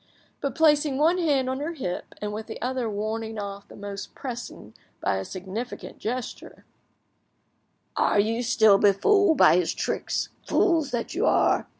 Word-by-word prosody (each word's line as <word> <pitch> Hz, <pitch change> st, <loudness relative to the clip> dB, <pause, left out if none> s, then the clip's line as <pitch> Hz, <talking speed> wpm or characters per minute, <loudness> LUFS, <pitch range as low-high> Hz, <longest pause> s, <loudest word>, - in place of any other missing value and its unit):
But, 275 Hz, -3 st, -3 dB
placing 295 Hz, -3 st, +3 dB
one 330 Hz, +5 st, +3 dB
hand 285 Hz, -6 st, +2 dB
on 260 Hz, +1 st, -2 dB
her 310 Hz, +4 st, -3 dB
hip, 180 Hz, -, -5 dB
and 210 Hz, 0 st, -4 dB
with 220 Hz, +1 st, -6 dB
the 220 Hz, -, -7 dB
other 250 Hz, -2 st, -2 dB
warning 220 Hz, +2 st, -3 dB
off 200 Hz, -1 st, -6 dB
the -, -, -13 dB
most 200 Hz, 0 st, -7 dB
pressing 240 Hz, -, -7 dB, 0.3 s
by 95 Hz, -, 0 dB
a 95 Hz, -, -3 dB
significant 190 Hz, -, -7 dB
gesture— 245 Hz, +2 st, -5 dB, 1.3 s
"Are -, -, +2 dB
you 225 Hz, +3 st, +1 dB
still 220 Hz, -4 st, +5 dB
befooled 320 Hz, -, +4 dB
by 170 Hz, -, +6 dB
his 180 Hz, -2 st, 0 dB
tricks, -, -, -2 dB
fools 325 Hz, -7 st, +2 dB
that 240 Hz, -3 st, -3 dB
you 395 Hz, +9 st, +1 dB
are? -, -, +3 dB
230 Hz, 160 wpm, -25 LUFS, 205-285 Hz, 1.3 s, by